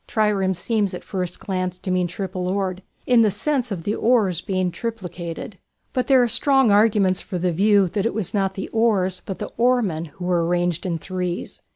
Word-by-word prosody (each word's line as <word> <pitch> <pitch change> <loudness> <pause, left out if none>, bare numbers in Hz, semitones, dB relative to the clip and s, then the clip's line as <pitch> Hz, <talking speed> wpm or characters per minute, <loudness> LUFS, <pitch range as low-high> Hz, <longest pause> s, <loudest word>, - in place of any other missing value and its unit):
Triêres 215 -2 +2
and 210 - +1
trireme 190 -1 +1
seems 205 0 0
at - - -8
first 180 -2 -4
glance 185 -2 -3
to 185 - -4
mean 180 -1 +1
triple 180 0 -4
oared, 190 -1 -2 0.2
in 245 -2 +5
the 220 - +4
sense 250 +5 -1
of 175 -4 -4
the 205 - -1
oars 215 -8 +2
being 185 -2 -1
triplicated; 180 -3 -6 0.3
but 255 - 0
there 265 -2 +5
are - - +2
strong 265 0 +3
arguments 205 -3 +3
for 185 - -5
the 180 0 0
view 200 +2 +4
that 200 +5 -1
it - - -3
was 215 -6 -2
not 195 -2 0
the 195 - -4
oars 200 -5 +1
but 195 - -5
the - - -6
oarsmen, 230 -10 +2
who 170 +3 -9
were 175 -2 +2
arranged 175 +1 0
in 170 -2 -1
"threes." 180 +1 -4
190 Hz, 210 wpm, -22 LUFS, 180-220 Hz, 0.3 s, in